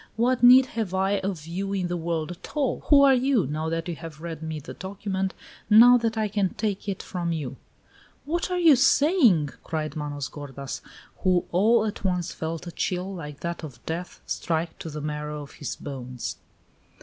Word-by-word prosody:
What 245 Hz, +2 st, +2 dB
need 250 Hz, +2 st, +9 dB
have 220 Hz, -7 st, -3 dB
I 195 Hz, +1 st, +2 dB
of 190 Hz, -5 st, -4 dB
you 195 Hz, +4 st, -3 dB
in 190 Hz, -2 st, 0 dB
the 175 Hz, -, -2 dB
world 165 Hz, -1 st, -2 dB
at 175 Hz, -, -10 dB
all? 275 Hz, -4 st, +1 dB
Who 280 Hz, -2 st, +7 dB
are 275 Hz, -1 st, +7 dB
you, 255 Hz, -5 st, +2 dB
now 155 Hz, +3 st, -2 dB
that 165 Hz, +1 st, -2 dB
you 170 Hz, -, -3 dB
have 160 Hz, -2 st, -9 dB
read 165 Hz, -1 st, -6 dB
me 160 Hz, -1 st, -4 dB
that -, -, -10 dB
document, 190 Hz, 0 st, -3 dB, 0.3 s
now 235 Hz, +3 st, +9 dB
that 225 Hz, -1 st, -1 dB
I 215 Hz, -1 st, +1 dB
can 200 Hz, -2 st, -1 dB
take 205 Hz, -2 st, -2 dB
it 195 Hz, -, -4 dB
from 175 Hz, -2 st, -3 dB
you?" 145 Hz, -6 st, -3 dB, 0.7 s
"What 335 Hz, +5 st, -1 dB
are 360 Hz, -, 0 dB
you 330 Hz, -5 st, +7 dB
saying?" 260 Hz, -, +4 dB
cried 155 Hz, -1 st, -3 dB
Manos 145 Hz, -2 st, -4 dB
gordas, 140 Hz, -2 st, -7 dB, 0.4 s
who 180 Hz, -2 st, +2 dB
all 220 Hz, +5 st, +4 dB
at 210 Hz, -, -4 dB
once 180 Hz, -3 st, -1 dB
felt 160 Hz, +1 st, -4 dB
a 170 Hz, -, -6 dB
chill, 180 Hz, +3 st, -2 dB
like 150 Hz, -5 st, -8 dB
that 170 Hz, 0 st, -4 dB
of 130 Hz, -6 st, -10 dB
death, 170 Hz, +2 st, -5 dB
strike 165 Hz, 0 st, -2 dB
to 160 Hz, -, -6 dB
the 150 Hz, 0 st, -6 dB
marrow 150 Hz, 0 st, -4 dB
of 140 Hz, -, -12 dB
his 145 Hz, -, -5 dB
bones. 125 Hz, -3 st, -6 dB
180 Hz, 195 wpm, -26 LUFS, 155-215 Hz, 0.7 s, need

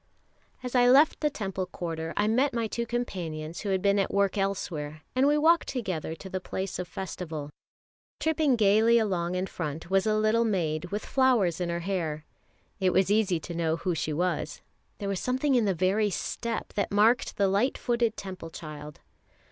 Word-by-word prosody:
As 250 Hz, -, -5 dB
I 245 Hz, -1 st, +5 dB
left 285 Hz, +5 st, +5 dB
the 300 Hz, -, +2 dB
Temple 195 Hz, -7 st, -4 dB
quarter, 165 Hz, -2 st, -4 dB
I 205 Hz, -, +2 dB
met 250 Hz, +4 st, +2 dB
my 230 Hz, -1 st, 0 dB
two 235 Hz, +2 st, -3 dB
companions 170 Hz, -9 st, -4 dB
who 205 Hz, -, -4 dB
had 190 Hz, -1 st, 0 dB
been 200 Hz, 0 st, +3 dB
at 195 Hz, -, 0 dB
work 200 Hz, -1 st, +2 dB
elsewhere, 160 Hz, -6 st, -3 dB
and 260 Hz, +2 st, +4 dB
we 295 Hz, +1 st, +4 dB
walked 330 Hz, +3 st, +4 dB
together 185 Hz, -, -3 dB
to 190 Hz, -, -10 dB
the 190 Hz, 0 st, -3 dB
place 190 Hz, +1 st, -4 dB
of 180 Hz, -, -4 dB
festival. 165 Hz, -5 st, -6 dB, 0.7 s
Tripping 315 Hz, -4 st, +2 dB
gaily 220 Hz, +2 st, +4 dB
along 180 Hz, -5 st, 0 dB
in 185 Hz, +1 st, 0 dB
front 165 Hz, -1 st, -5 dB
was 195 Hz, +2 st, +3 dB
a 215 Hz, -, +3 dB
little 215 Hz, +2 st, +3 dB
maid 170 Hz, -7 st, 0 dB
with 205 Hz, +4 st, -4 dB
flowers 240 Hz, -11 st, +2 dB
in 175 Hz, -, -1 dB
her 170 Hz, 0 st, -2 dB
hair. 165 Hz, -5 st, -2 dB, 0.5 s
It 185 Hz, -2 st, +2 dB
was 190 Hz, +1 st, +3 dB
easy 205 Hz, -5 st, +2 dB
to 170 Hz, -, -7 dB
know 165 Hz, -1 st, 0 dB
who 180 Hz, +2 st, -2 dB
she 155 Hz, -1 st, -2 dB
was, 175 Hz, +4 st, -2 dB, 0.3 s
there 200 Hz, -, -4 dB
was 195 Hz, -2 st, -1 dB
something 260 Hz, +3 st, 0 dB
in 240 Hz, -4 st, +3 dB
the 195 Hz, -2 st, +1 dB
very 195 Hz, +4 st, +2 dB
step 230 Hz, +4 st, -4 dB
that 200 Hz, -, -1 dB
marked 220 Hz, +5 st, +3 dB
the 200 Hz, -, +3 dB
light 200 Hz, +7 st, +1 dB
footed 235 Hz, -2 st, 0 dB
Temple 185 Hz, -4 st, -7 dB
child. 150 Hz, -2 st, -9 dB
195 Hz, 190 wpm, -28 LUFS, 170-230 Hz, 0.7 s, I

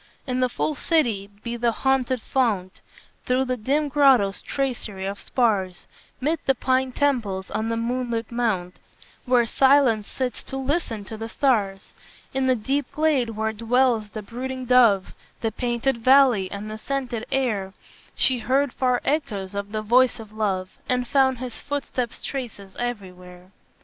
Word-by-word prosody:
"In 255 Hz, -1 st, -1 dB
the 255 Hz, 0 st, +2 dB
full 305 Hz, -, -1 dB
city, 240 Hz, -, +1 dB, 0.2 s
by 235 Hz, 0 st, -3 dB
the 235 Hz, 0 st, +2 dB
haunted 260 Hz, 0 st, 0 dB
fount, 210 Hz, -8 st, -1 dB, 0.5 s
Through 255 Hz, +1 st, +2 dB
the 255 Hz, 0 st, -1 dB
dim 280 Hz, +6 st, 0 dB
grotto's 270 Hz, -9 st, +4 dB
tracery 240 Hz, -8 st, -3 dB
of 200 Hz, +1 st, -4 dB
spars, 195 Hz, -7 st, 0 dB, 0.3 s
'Mid 310 Hz, +4 st, 0 dB
the 270 Hz, -, +4 dB
pine 260 Hz, +1 st, +1 dB
temples, 230 Hz, -10 st, -1 dB
on 220 Hz, +2 st, -1 dB
the 230 Hz, -, -1 dB
moonlit 235 Hz, -1 st, -2 dB
mount, 210 Hz, -7 st, -1 dB, 0.5 s
Where 250 Hz, -2 st, +4 dB
silence 260 Hz, -4 st, +4 dB
sits 255 Hz, -2 st, -4 dB
to 270 Hz, -, -5 dB
listen 265 Hz, -, -2 dB
to 220 Hz, -, -7 dB
the 225 Hz, +1 st, -6 dB
stars; 205 Hz, -8 st, 0 dB, 0.4 s
In 265 Hz, 0 st, +1 dB
the 255 Hz, -, +4 dB
deep 265 Hz, +4 st, -2 dB
glade 300 Hz, -6 st, +1 dB
where 220 Hz, 0 st, -2 dB
dwells 230 Hz, -1 st, +1 dB
the 215 Hz, 0 st, -7 dB
brooding 255 Hz, +4 st, -5 dB
dove, 235 Hz, -6 st, +4 dB, 0.3 s
The 225 Hz, -, 0 dB
painted 240 Hz, +3 st, -1 dB
valley, 255 Hz, -6 st, +5 dB
and 205 Hz, +2 st, -6 dB
the 215 Hz, -, -6 dB
scented 250 Hz, -3 st, -3 dB
air, 225 Hz, -8 st, 0 dB, 0.4 s
She 255 Hz, -2 st, +2 dB
heard 265 Hz, +3 st, +1 dB
far 250 Hz, -1 st, +1 dB
echoes 210 Hz, -10 st, -1 dB
of 200 Hz, 0 st, -4 dB
the 215 Hz, 0 st, -3 dB
voice 245 Hz, +3 st, +4 dB
of 220 Hz, -2 st, -10 dB
Love, 195 Hz, -4 st, -1 dB, 0.2 s
And 250 Hz, -1 st, +1 dB
found 265 Hz, -1 st, +3 dB
his 245 Hz, -1 st, -7 dB
footsteps' 275 Hz, -4 st, -3 dB
traces 220 Hz, -8 st, -6 dB
everywhere. 180 Hz, -6 st, -6 dB
240 Hz, 155 wpm, -24 LUFS, 210-265 Hz, 0.5 s, valley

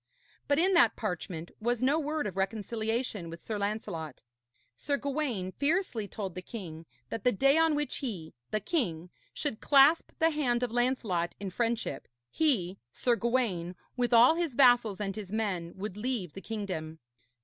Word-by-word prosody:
But 285 Hz, -, +3 dB
in 370 Hz, +4 st, +3 dB
that 340 Hz, -1 st, +5 dB
parchment 175 Hz, -5 st, -4 dB
was 240 Hz, +2 st, 0 dB
no 285 Hz, +5 st, +3 dB
word 305 Hz, 0 st, -2 dB
of 195 Hz, -, -4 dB
reconciliation 220 Hz, 0 st, -2 dB
with 165 Hz, 0 st, -9 dB
Sir 215 Hz, -2 st, -3 dB
Lancelot. 200 Hz, -, -4 dB, 0.5 s
Sir 285 Hz, -, -1 dB
Gawaine 270 Hz, -10 st, -2 dB
fiercely 285 Hz, -, 0 dB
told 195 Hz, -3 st, -5 dB
the 185 Hz, -, -5 dB
king 170 Hz, -6 st, -8 dB, 0.2 s
that 220 Hz, -, -4 dB
the 250 Hz, -, +4 dB
day 275 Hz, +7 st, +4 dB
on 325 Hz, -2 st, +4 dB
which 295 Hz, 0 st, -1 dB
he, 190 Hz, -, -5 dB, 0.2 s
the 215 Hz, -, 0 dB
king, 180 Hz, -, -2 dB, 0.2 s
should 280 Hz, -7 st, -3 dB
clasp 285 Hz, +3 st, +5 dB
the 325 Hz, 0 st, +3 dB
hand 250 Hz, -5 st, 0 dB
of 245 Hz, -, -1 dB
Lancelot 235 Hz, -8 st, 0 dB
in 195 Hz, -2 st, -4 dB
friendship, 235 Hz, +3 st, -2 dB, 0.2 s
he, 200 Hz, -, +1 dB
Sir 240 Hz, -, +1 dB
Gawaine, 230 Hz, -8 st, 0 dB, 0.2 s
with 245 Hz, -1 st, 0 dB
all 240 Hz, +5 st, +7 dB
his 330 Hz, -6 st, -2 dB
vassals 245 Hz, -6 st, +5 dB
and 195 Hz, -2 st, -2 dB
his 205 Hz, -3 st, -7 dB
men, 195 Hz, -6 st, -1 dB
would 195 Hz, 0 st, -5 dB
leave 210 Hz, -, -3 dB
the 195 Hz, -, -8 dB
kingdom. 185 Hz, -8 st, -4 dB
225 Hz, 165 wpm, -30 LUFS, 190-265 Hz, 0.5 s, all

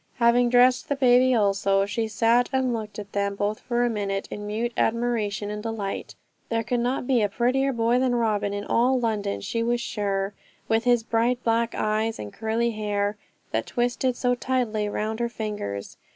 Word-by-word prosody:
Having 240 Hz, 0 st, +4 dB
dressed 250 Hz, +1 st, +4 dB
the 285 Hz, -, +1 dB
baby 255 Hz, -1 st, +4 dB
also, 195 Hz, -2 st, +2 dB
she 225 Hz, +2 st, -2 dB
sat 230 Hz, +3 st, +2 dB
and 260 Hz, -2 st, +1 dB
looked 215 Hz, -2 st, -5 dB
at 205 Hz, -1 st, -7 dB
them 200 Hz, 0 st, -1 dB
both 205 Hz, +2 st, -1 dB
for 240 Hz, -1 st, 0 dB
a -, -, +1 dB
minute 200 Hz, -2 st, -2 dB
in 205 Hz, 0 st, -5 dB
mute 230 Hz, +3 st, -2 dB
admiration 220 Hz, -3 st, 0 dB
and 210 Hz, 0 st, -5 dB
delight. 215 Hz, -3 st, -4 dB, 0.3 s
There 230 Hz, 0 st, 0 dB
could 240 Hz, +2 st, -1 dB
not 245 Hz, +2 st, -1 dB
be 245 Hz, -2 st, +2 dB
a 205 Hz, -, +2 dB
prettier 255 Hz, +6 st, +1 dB
boy 235 Hz, 0 st, +2 dB
than 255 Hz, -1 st, +1 dB
Robin 215 Hz, -3 st, 0 dB
in 205 Hz, 0 st, -3 dB
all 255 Hz, +2 st, +2 dB
London, 210 Hz, -, -1 dB
she 230 Hz, -, -2 dB
was 240 Hz, +1 st, +1 dB
sure, 200 Hz, -3 st, -2 dB, 0.3 s
with 225 Hz, +2 st, +1 dB
his 240 Hz, -2 st, +3 dB
bright 235 Hz, +2 st, 0 dB
black 230 Hz, 0 st, +1 dB
eyes 215 Hz, +1 st, 0 dB
and 105 Hz, -1 st, -7 dB
curly 225 Hz, +2 st, 0 dB
hair, 205 Hz, -1 st, -1 dB, 0.4 s
that -, -, -1 dB
twisted 245 Hz, +1 st, 0 dB
so 245 Hz, 0 st, +1 dB
tightly 245 Hz, -5 st, -1 dB
round 215 Hz, +2 st, -3 dB
her 235 Hz, 0 st, 0 dB
fingers. 205 Hz, -, -5 dB
225 Hz, 185 wpm, -25 LUFS, 210-245 Hz, 0.4 s, Having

